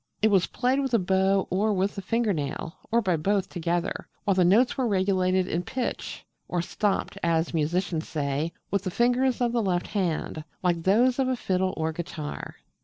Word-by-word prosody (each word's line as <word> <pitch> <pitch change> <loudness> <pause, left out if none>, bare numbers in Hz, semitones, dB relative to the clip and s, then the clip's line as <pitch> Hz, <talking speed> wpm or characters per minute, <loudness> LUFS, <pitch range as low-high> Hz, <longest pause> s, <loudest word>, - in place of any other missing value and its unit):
It 220 - +5
was 190 -3 +4
played 255 +2 +1
with 265 -3 +1
a - - +6
bow 190 0 +2
or 205 +4 +2
with 195 +1 0
the 195 - -5
finger 225 +2 +1
nail, 150 +1 -4
or 230 +1 +2
by 180 -4 +2
both 195 +5 0
together, 175 0 -2 0.2
while 200 - +2
the 185 -1 +3
notes 215 +8 +4
were 260 -3 0
regulated 185 -2 +2
in 170 - -1
pitch 250 +8 -4 0.2
or 180 - -1
'stopped' 200 +4 -1
as 165 0 +1
musicians 165 +1 0
say 145 +1 -1 0.2
with 200 - +1
the 185 - -2
fingers 245 +5 +2
of 240 -1 +2
the 235 -1 +1
left 180 -4 0
hand, 170 -5 -2 0.2
like 175 -2 +1
those 240 +9 +3
of 265 - +2
a 260 - +1
fiddle 185 -5 -1
or 160 0 0
guitar. 155 -2 -6
190 Hz, 190 wpm, -26 LUFS, 170-220 Hz, 0.2 s, a